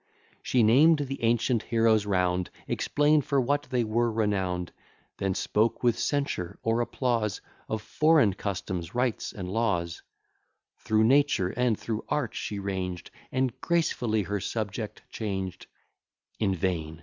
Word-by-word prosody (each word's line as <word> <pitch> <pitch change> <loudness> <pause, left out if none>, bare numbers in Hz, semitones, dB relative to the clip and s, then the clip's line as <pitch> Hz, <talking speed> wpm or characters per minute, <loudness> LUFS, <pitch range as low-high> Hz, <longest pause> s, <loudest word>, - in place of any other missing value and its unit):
She 125 -2 +2
named 145 +9 +6
the 135 -1 -4
ancient 115 0 +2
heroes 115 -2 +2
round, 90 -2 +1 0.2
Explain'd 150 0 +2
for 140 -1 +1
what 145 +3 0
they 125 -2 +1
were 115 +2 +1
renown'd; 95 -5 -1 0.5
Then 95 -1 -1
spoke 110 +4 0
with 120 -2 +2
censure 100 -10 -1
or 115 +1 +1
applause 120 -4 -1 0.3
Of 110 -1 -2
foreign 150 -9 +4
customs, 95 -2 -4
rites, 125 -2 0
and 95 -3 -6
laws; 95 -5 -1 0.8
Through 110 0 +2
nature 135 -6 +3
and 125 0 +1
through 110 -2 -3
art 145 -7 -1
she 105 - -4
ranged 95 -2 -4 0.2
And 130 -2 -1
gracefully 125 -11 +1
her 100 +2 -2
subject 105 +1 -4
changed; 95 -4 -4 0.7
In 95 -3 +1
vain! 80 -3 -2
110 Hz, 135 wpm, -28 LUFS, 95-125 Hz, 0.8 s, named